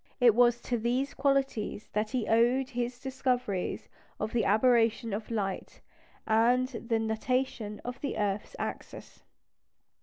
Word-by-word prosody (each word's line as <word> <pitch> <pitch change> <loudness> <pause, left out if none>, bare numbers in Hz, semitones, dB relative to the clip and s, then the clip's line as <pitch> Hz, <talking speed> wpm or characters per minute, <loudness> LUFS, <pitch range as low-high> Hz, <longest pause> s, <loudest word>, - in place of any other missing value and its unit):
It 245 -3 +6
was 240 +1 +4
to 240 -2 -2
these 250 +5 0
qualities 270 -7 0
that 215 +1 0
he 250 -4 -2
owed 245 +4 +3
his 245 0 -3
discoveries 255 -7 -2 0.3
of 215 +1 -3
the 235 - +1
aberration 230 0 +3
of 215 +2 -4
light 200 -4 -3 0.5
and 235 +3 +3
the 230 -2 -2
nutation 220 -1 -2
of 245 +1 -6
the 280 - -3
earth's 205 0 -2
axis. - - -7
235 Hz, 130 wpm, -29 LUFS, 220-255 Hz, 0.5 s, It